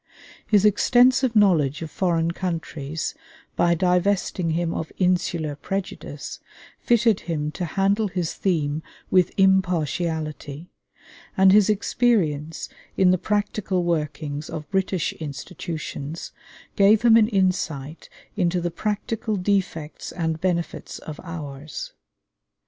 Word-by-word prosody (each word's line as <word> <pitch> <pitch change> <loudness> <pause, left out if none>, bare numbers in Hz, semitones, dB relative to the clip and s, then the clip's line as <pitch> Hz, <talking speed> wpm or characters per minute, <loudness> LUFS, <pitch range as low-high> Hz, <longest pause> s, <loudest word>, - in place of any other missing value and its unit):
His 210 -1 +4
extensive 250 +4 +4
knowledge 165 -8 +3
of 160 - -7
foreign 170 -3 +1
countries, 165 -4 -4 0.4
by 170 0 +3
divesting 180 0 +1
him 165 +1 0
of 160 - -4
insular 175 -4 0
prejudice, 195 +6 -5 0.4
fitted 230 -3 +3
him 150 -3 -3
to 180 - -4
handle 200 +5 +1
his 180 -4 -2
theme 155 -5 0 0.3
with 185 -2 +4
impartiality, 170 -5 0 0.7
and 190 0 +7
his 210 +1 +5
experience 180 -8 +1 0.3
in 185 -1 +5
the 185 - +2
practical 205 -3 -1
workings 150 -3 -2
of 155 -2 -6
British 190 -3 0
institutions 155 +1 -6 0.4
gave 205 +3 +5
him 230 -2 +7
an 220 -2 +6
insight 175 - -1 0.3
into 180 -3 +1
the 175 0 -2
practical 215 +3 -2
defects 185 -5 -2
and 160 -2 -2
benefits 175 -2 -2
of 155 -2 -9
ours. 150 -4 -7
175 Hz, 110 wpm, -24 LUFS, 160-195 Hz, 0.7 s, and